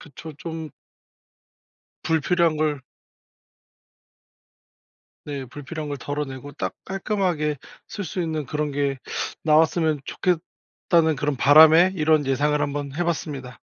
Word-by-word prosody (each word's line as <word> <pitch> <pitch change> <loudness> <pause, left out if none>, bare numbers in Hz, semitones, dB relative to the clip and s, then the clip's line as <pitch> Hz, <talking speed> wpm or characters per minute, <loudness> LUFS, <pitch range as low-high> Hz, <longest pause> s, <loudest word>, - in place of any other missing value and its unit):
그쵸. 155 +1 -10
좀 160 -2 -6 1.3
불필요한 165 0 +2
걸 150 -2 0 2.4
네. 140 -2 -5
"불필요한 145 +4 -7
걸 145 -1 -4
덜어내고 145 -1 -5
딱 - - -4
깔끔하게 185 -6 -1 0.3
쓸 205 - -5
수 180 - -4
있는 155 -4 -3
그런 150 +1 -2
게 140 -1 -1 0.5
나왔으면 155 0 +3
좋겠다."는 165 -2 0
그런 145 -1 -1
바람에 160 +6 +7
이런 155 -2 +3
예상을 145 +2 +1
한번 145 -1 -3
해 175 +2 -1
봤습니다. 140 -6 -4
150 Hz, 240 characters per minute, -23 LUFS, 145-165 Hz, 2.4 s, 바람에